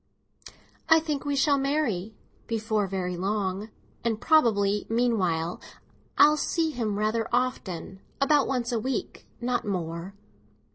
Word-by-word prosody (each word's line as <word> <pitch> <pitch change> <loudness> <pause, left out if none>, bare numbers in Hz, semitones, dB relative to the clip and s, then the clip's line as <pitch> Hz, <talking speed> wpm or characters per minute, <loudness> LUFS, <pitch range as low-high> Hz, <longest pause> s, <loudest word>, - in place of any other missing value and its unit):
"I 320 0 +8
think 300 -3 -3
we 285 -1 0
shall 280 +1 +3
marry—before 220 -4 -2
very 180 -1 -3
long. 195 +2 -2 0.3
And 225 -2 0
probably, 210 -9 +3
meanwhile, 190 -8 0 0.6
I - - +8
shall 300 +1 +6
see 320 +1 0
him 220 -7 -2
rather 215 +2 0
often; 195 -7 -2 0.2
about 280 0 +3
once 250 -2 -1
a 235 - 0
week, 260 +4 -4
not 245 0 -1
more." 175 -1 -4
225 Hz, 125 wpm, -27 LUFS, 195-270 Hz, 0.6 s, I